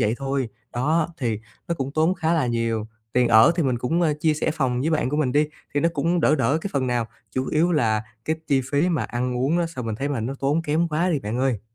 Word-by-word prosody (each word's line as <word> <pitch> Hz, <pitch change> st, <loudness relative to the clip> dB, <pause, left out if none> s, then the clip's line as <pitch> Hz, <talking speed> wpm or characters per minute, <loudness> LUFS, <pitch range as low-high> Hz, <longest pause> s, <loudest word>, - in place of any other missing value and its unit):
vậy 105 Hz, +2 st, +2 dB
thôi. 135 Hz, -2 st, -1 dB, 0.2 s
Đó, 155 Hz, +6 st, +1 dB
thì 115 Hz, -5 st, -1 dB, 0.3 s
nó 170 Hz, -, +1 dB
cũng 135 Hz, -2 st, -4 dB
tốn 160 Hz, +4 st, +2 dB
khá 165 Hz, -2 st, 0 dB
là 150 Hz, -6 st, +1 dB
nhiều. 115 Hz, -2 st, -1 dB, 0.3 s
Tiền 125 Hz, -1 st, +3 dB
ở 110 Hz, +7 st, +7 dB
thì 170 Hz, -, +2 dB
mình 125 Hz, -3 st, 0 dB
cũng, 160 Hz, +8 st, 0 dB
ơ, 155 Hz, -3 st, +3 dB
chia 155 Hz, -1 st, +3 dB
sẻ 155 Hz, -, 0 dB
phòng 130 Hz, -5 st, 0 dB
với 155 Hz, +5 st, 0 dB
bạn 150 Hz, -5 st, +1 dB
của 150 Hz, -, -1 dB
mình 145 Hz, -5 st, +1 dB
đi, 150 Hz, +2 st, +3 dB, 0.3 s
thì 145 Hz, -, +2 dB
nó 165 Hz, -, +3 dB
cũng 170 Hz, +4 st, +1 dB
đỡ 150 Hz, -1 st, +4 dB
đỡ 140 Hz, +3 st, +1 dB
cái 200 Hz, -, -5 dB
phần 135 Hz, -2 st, 0 dB
nào. 120 Hz, -2 st, 0 dB, 0.3 s
Chủ 130 Hz, 0 st, -1 dB
yếu 170 Hz, +3 st, +2 dB
là 110 Hz, -8 st, +2 dB, 0.2 s
cái 160 Hz, -, 0 dB
chi 135 Hz, -2 st, +3 dB
phí 145 Hz, +5 st, +2 dB
mà 170 Hz, -3 st, 0 dB
ăn 125 Hz, +1 st, -2 dB
uống 135 Hz, +7 st, +1 dB
á, 170 Hz, -, +1 dB
sao 130 Hz, -8 st, -6 dB
mình 110 Hz, -, -2 dB
thấy 135 Hz, +6 st, -2 dB
mà 140 Hz, -5 st, -2 dB
nó 125 Hz, +5 st, -3 dB
tốn 145 Hz, +4 st, +1 dB
kém 160 Hz, +3 st, +1 dB
quá 165 Hz, +4 st, +1 dB
đi 155 Hz, -, +1 dB
bạn 115 Hz, -1 st, -4 dB
ơi! 130 Hz, -5 st, +1 dB
140 Hz, 270 wpm, -23 LUFS, 125-160 Hz, 0.3 s, ở